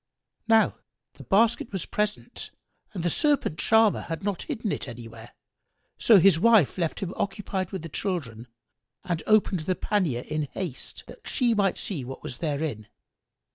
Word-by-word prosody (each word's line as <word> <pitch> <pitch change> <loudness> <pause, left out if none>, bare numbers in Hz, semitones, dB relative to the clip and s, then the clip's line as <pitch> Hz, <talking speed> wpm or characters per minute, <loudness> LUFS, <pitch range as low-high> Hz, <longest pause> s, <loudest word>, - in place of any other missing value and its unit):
Now 225 -1 +4 0.3
the - - -12
basket 225 +3 +2
was 190 -4 -3
present 210 0 -3 0.4
and 180 -6 -5
the 175 - +2
Serpent 290 - +1
charmer 220 -2 +4
had 165 +3 -5
not 200 -2 -2
hidden 230 -9 -3
it - - -3
anywhere, 115 -1 -10 0.6
so 225 - +7
his 180 -2 +5
wife 215 - +4
left 165 -3 -1
him 190 -2 -3
occupied 195 -2 -2
with 190 -5 -5
the - - -5
children 140 - -4 0.6
and 175 -3 -2
opened 215 -4 +3
the 180 +4 -1
pannier 175 - 0
in 155 +2 -3
haste, 170 -9 -6
that - - -13
she 245 -4 +2
might 200 -3 +1
see 165 -10 -3
what 130 +2 -8
was 135 -4 -7
therein. 145 -8 -2
185 Hz, 160 wpm, -26 LUFS, 150-210 Hz, 0.6 s, so